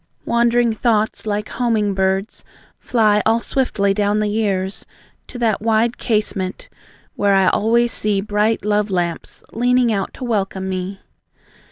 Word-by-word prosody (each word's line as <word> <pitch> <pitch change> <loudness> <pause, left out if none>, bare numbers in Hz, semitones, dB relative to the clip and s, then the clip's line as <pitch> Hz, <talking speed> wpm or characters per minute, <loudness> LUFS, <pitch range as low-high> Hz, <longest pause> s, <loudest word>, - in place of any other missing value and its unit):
Wandering 235 0 +2
thoughts, 220 -1 0
like 210 0 -2
homing 220 -5 0
birds, 190 +2 -1 0.4
Fly 215 -3 +2
all 225 +1 +2
swiftly 215 -6 0
down 205 +1 +1
the 210 0 0
years, 200 -3 -2 0.4
To 250 - -9
that 225 -4 0
wide 225 +2 +1
casement, 210 -4 -2 0.4
where 200 -1 +2
I 190 -1 +4
always 235 +2 +2
see 205 -2 +1
Bright 210 +2 0
love 210 0 +1
lamps 175 -3 -3
leaning 245 0 +2
out 195 -2 -2
to - - -8
welcome 195 -5 -2
me. 190 +1 -4
210 Hz, 140 wpm, -19 LUFS, 195-230 Hz, 0.4 s, I